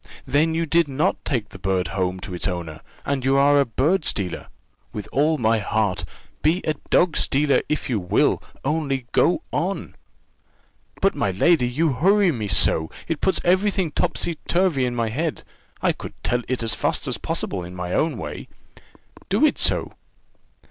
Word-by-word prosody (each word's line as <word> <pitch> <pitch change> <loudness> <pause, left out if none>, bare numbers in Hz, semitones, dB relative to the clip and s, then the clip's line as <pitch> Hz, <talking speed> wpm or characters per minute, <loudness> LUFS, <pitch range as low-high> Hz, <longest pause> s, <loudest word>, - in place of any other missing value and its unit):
"Then 160 +3 +2
you 165 0 0
did 165 +1 +3
not 145 +7 -1
take 120 -7 -2
the 95 - -12
bird 95 -1 -1
home 95 -1 -2
to 90 - -7
its 90 - 0
owner 85 -4 -5 0.2
and 140 -2 -1
you 135 +1 +3
are 145 +1 +5
a 140 - +3
bird 150 - +1
stealer? 95 -10 -1 0.4
With 105 - -6
all 150 +4 +2
my 115 -3 +2
heart: 100 -5 -1 0.4
be 165 +5 +2
a 155 - 0 0.2
dog 175 -2 +3
stealer, 140 +1 +2
if 150 - -1
you 120 -5 0
will 90 -2 +1 0.2
only 140 -4 -1
go - - +2
on." - - -2 1.1
"But, - - +3
my - - 0
lady, 125 - +3
you 150 +4 +1
hurry 190 +7 +3
me 110 -7 -3
so, 80 -4 +2 0.2
it 165 -3 -3
puts 190 - +2
every 185 +4 +3
thing 190 -5 -1
topsy 170 0 -1
turvy 170 -7 +2
in 120 - -3
my 115 -2 0
head; 155 +7 -3 0.4
I - - +4
could - - -8
tell 120 0 +1
it 130 -2 -2
as 115 0 0
fast - - -1
as - - -2
possible 90 -3 -3
my 90 0 -5
own 155 -5 +1
way." 75 -6 -6 0.8
"Do - - +4
so, - - +3
then." - - -25
135 Hz, 175 wpm, -23 LUFS, 100-160 Hz, 1.1 s, are